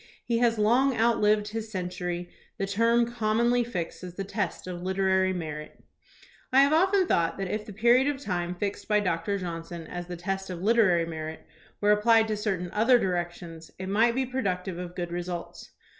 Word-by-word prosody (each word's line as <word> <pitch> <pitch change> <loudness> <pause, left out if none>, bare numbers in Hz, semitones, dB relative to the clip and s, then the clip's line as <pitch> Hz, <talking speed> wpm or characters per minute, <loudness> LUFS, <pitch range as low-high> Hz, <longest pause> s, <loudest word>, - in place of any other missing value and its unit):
He 235 -1 +1
has 235 -1 +2
long 240 +5 +3
outlived 215 -2 +3
his 220 0 -5
century, 180 -2 -4 0.3
the 195 - -1
term 230 +4 +3
commonly 235 +1 +1
fixed 185 -7 -5
as 180 -1 -8
the 195 - -3
test 200 +1 -3
of 180 -1 -6
literary 190 0 +1
merit." 155 -4 -6 0.7
I 265 +1 +6
have 280 +2 +4
often 375 +3 +4
thought 170 - +1
that 195 -1 -3
if 210 +1 -3
the - - -7
period 240 +6 +4
of 290 -2 -1
time 180 -8 -3
fixed 200 +2 -4
by 210 -1 +3
Doctor 185 0 -1
Johnson 170 -2 -6
as 175 +1 -6
the 175 -1 -6
test 195 +2 -3
of 180 -1 -6
literary 205 -6 +4
merit 160 -1 -6 0.4
were 205 0 +4
applied 220 +1 +4
in 215 - -1
certain 190 -4 -2
other 235 +4 +4
directions, 175 -4 -4
it 190 0 -5
might 230 +4 +3
be 265 0 +1
pro 260 +1 -3
ductive 180 -3 -2
of 180 0 -7
good 175 -1 -4
results. 175 0 -5
195 Hz, 190 wpm, -27 LUFS, 175-230 Hz, 0.7 s, I